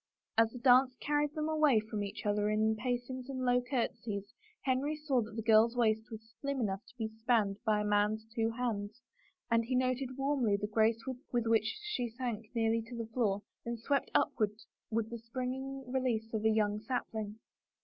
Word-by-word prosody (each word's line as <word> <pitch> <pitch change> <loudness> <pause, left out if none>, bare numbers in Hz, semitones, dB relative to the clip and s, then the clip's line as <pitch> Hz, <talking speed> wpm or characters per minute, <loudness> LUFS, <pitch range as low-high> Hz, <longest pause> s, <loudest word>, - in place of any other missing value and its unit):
As 225 0 +5
the 245 - -9
dance 255 +1 +5
carried 295 +1 0
them 305 0 -1
away 305 -7 +4
from 215 -1 -3
each 205 +3 -6
other 210 0 +2
in 215 +1 +2
pacings 245 +2 -3
and 260 -1 -2
low 245 0 +4
courtesies, 230 -5 -3 0.3
Henry 270 +3 +1
saw 295 -5 +1
that 215 0 -7
the 225 - -3
girl's 225 +2 +5
waist 220 -2 +2
was 220 0 -10
slim 280 -1 -1
enough 200 -2 -1
to 250 - -19
be 220 -2 -1
spanned 220 -2 +1
by 210 -1 +3
a - - -1
man's 210 +1 +2
two 225 -1 +1
hands, 225 -2 -3 0.5
and 230 0 +4
he 255 +2 -1
noted 255 0 0
warmly 270 -7 +2
the 205 - -2
grace 220 +2 +2
with 250 -2 -3
which 225 -1 +2
she 260 - -2
sank 225 -2 -4
nearly 225 0 +2
to 230 +2 -9
the 225 -1 -5
floor 205 -5 +1 0.2
and 235 0 -3
then 225 - -19
swept 280 -1 +1
upward 210 -3 +2 0.4
with 225 -1 0
the 235 - -5
springing 260 +3 -4
release 235 -4 0
of 220 -1 -1
a - - +6
young 210 -1 +2
sapling. 220 -2 -3
230 Hz, 190 wpm, -33 LUFS, 215-255 Hz, 0.5 s, a